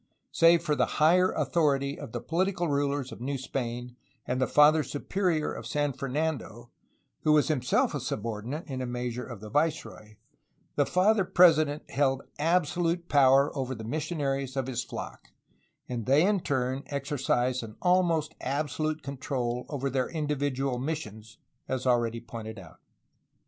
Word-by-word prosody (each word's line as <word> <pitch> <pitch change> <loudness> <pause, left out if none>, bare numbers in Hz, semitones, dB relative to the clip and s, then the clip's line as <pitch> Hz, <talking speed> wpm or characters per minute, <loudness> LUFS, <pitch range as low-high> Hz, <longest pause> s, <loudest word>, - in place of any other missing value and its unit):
Save 165 0 +5
for 150 - +1
the - - +2
higher 180 +4 +5
authority 140 -2 +1
of - - -8
the - - -4
political 180 +1 0
rulers 140 -2 -1
of 115 - -10
New 135 +2 -2
Spain 125 -1 -5 0.3
and 130 +1 -1
the 130 - +2
Father 150 +1 +6
Superior 160 +3 -1
of - - -7
San 145 -1 0
Fernando 135 -3 -3 0.5
(who 155 - +3
was 150 0 +3
himself 130 -5 +1
a - - -2
subordinate, 115 +8 -4
in 130 -3 -4
a 130 - -3
measure, 125 0 -3
of 120 -5 -9
the 105 -1 -9
viceroy), 145 -7 -2 0.6
the 145 - +2
Father 195 +3 +3
President 155 -5 +4
held 135 -1 +1 0.2
absolute 170 +1 +1
power 140 0 +5
over 130 -2 -2
the 110 - -8
missionaries 140 0 -2
of 135 - 0
his 125 -2 -2
flock, - - -8 0.6
and 120 -3 -4
they 145 +6 +5
in 205 0 +2
turn 130 -4 -1
exercised 135 -3 -1
an 110 -2 -9
almost 180 -3 +2
absolute 155 +2 -2
control 130 -3 -3
over 140 -2 -2
their 130 -1 -1
individual 140 -4 -1
missions, 110 -7 -5 0.3
as 130 -1 -3
already 120 -2 +2
pointed 115 -1 -8
out. 90 -4 -13
140 Hz, 150 wpm, -28 LUFS, 125-155 Hz, 0.6 s, Father